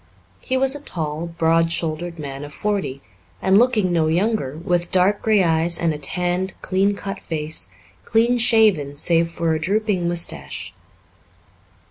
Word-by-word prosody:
He 260 - -2
was 265 0 +2
a 290 - -6
tall, 160 - -4
broad 165 0 +1
shouldered 170 +1 -2
man 140 -2 -6
of 145 - -9
forty, 195 -10 -2 0.4
and 190 +2 +4
looking 220 -7 +2
no 160 -2 +2
younger, 170 -4 0
with 175 +1 -1
dark 190 +3 +3
grey 215 -3 +3
eyes 165 0 +2
and 165 -2 0
a 150 - -6
tanned, 180 +5 -1
clean 195 +2 +1
cut 195 0 -6
face, 155 - -2 0.3
clean 235 - +2
shaven 215 - +3
save 165 +2 +2
for 165 -1 -1
a 160 - -1
drooping 195 0 0
moustache. 165 - -2
175 Hz, 150 wpm, -21 LUFS, 160-205 Hz, 0.4 s, and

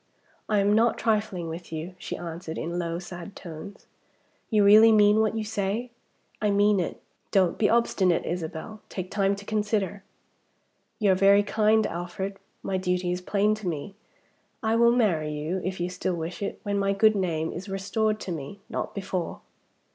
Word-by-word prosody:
"I 210 - +2
am 200 +1 +3
not 230 +2 +3
trifling 210 -6 0
with 165 +1 -7
you," 160 +3 -5
she - - -5
answered, 165 -1 -6
in 170 +2 -3
low, 170 -1 -2
sad 175 +2 -8
tones. 175 +3 -9 0.6
"You 215 -3 +4
really 215 +3 +8
mean 210 0 +5
what 220 0 +1
you 220 - -1
say?" 210 +3 -2 0.5
"I 210 - +2
mean 205 0 +4
it." 175 - -3 0.3
"Don't 185 -3 +2
be 210 - +3
obstinate, 200 -6 +2
Isabel. 175 +5 -5
Take 185 -1 -5
time 200 -1 +2
to 200 0 -11
consider." 205 -2 -1 0.9
"You 205 -3 +3
are - - +6
very 200 +2 +5
kind, 215 +1 +3
Alfred. 180 +3 -4 0.3
My 190 - -1
duty 180 -1 0
is 180 0 -2
plain 205 +3 +2
to 215 -3 -5
me. 165 +3 -4 0.7
I 220 0 +2
will 235 0 +5
marry 180 -11 +1
you 155 +5 -3
if 185 0 -3
you 175 - 0
still 180 0 -2
wish 165 +3 -5
it 200 - -3
when 200 -1 -1
my 195 0 +1
good 215 +2 +4
name 165 -4 -1
is 185 +3 -7
restored 210 +3 -1
to 185 - -5
me. 160 +4 -6
Not - - -4
before." 190 -3 -3
195 Hz, 180 wpm, -26 LUFS, 175-210 Hz, 0.9 s, really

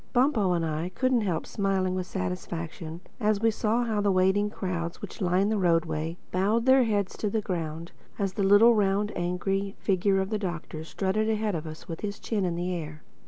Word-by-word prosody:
Bumpo 245 -8 +3
and 170 -1 0
I 160 +2 -2
couldn't 255 -2 +2
help 180 -6 -1
smiling 195 -2 0
with 185 -1 -3
satisfaction 170 -3 -5 0.2
as 210 -2 +2
we 225 +1 +3
saw 220 +3 +1
how 220 -3 0
the 205 - +2
waiting 190 +2 +3
crowds 175 -4 -4
which - - -8
lined 185 +3 +2
the 215 - +1
roadway 165 -2 +1
bowed 210 +6 +1
their 260 -1 +6
heads 205 -4 0
to 210 - -1
the 220 - 0
ground, 165 -4 -4 0.3
as 195 -2 -1
the 200 - -2
little, 205 +4 +7
round, 205 0 +1
angry 195 +3 -1
figure 195 0 +2
of 190 +2 -2
the 215 - 0
Doctor 170 -4 -5
strutted 195 +6 -1
ahead 215 -1 0
of 160 -1 -3
us 155 0 -9
with 165 -1 -6
his 205 -1 -4
chin 210 -4 -1
in 175 -2 -1
the 175 +1 -2
air. 155 -3 -6
190 Hz, 200 wpm, -27 LUFS, 175-210 Hz, 0.3 s, little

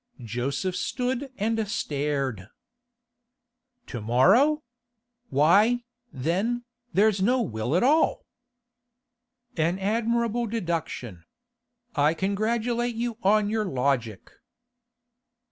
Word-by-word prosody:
Joseph 135 - -2
stood 255 +4 -2
and 220 +1 0
stared. 140 - -2 1.4
'To 120 - -6
morrow? 200 - +4 0.7
Why, 200 - +4 0.3
then, 190 - -1 0.3
there's 200 0 +3
no 245 +5 +3
will 115 - -2
at 180 - +3
all?' 300 +5 +3 1.3
'An 165 +3 +1
admirable 230 +3 0
deduction. 165 - -4 0.7
I 150 +3 +3
congratulate 230 +5 -1
you 235 0 -3
on 210 +1 +3
your 220 -1 0
logic. 125 - -1
200 Hz, 85 wpm, -26 LUFS, 140-235 Hz, 1.4 s, morrow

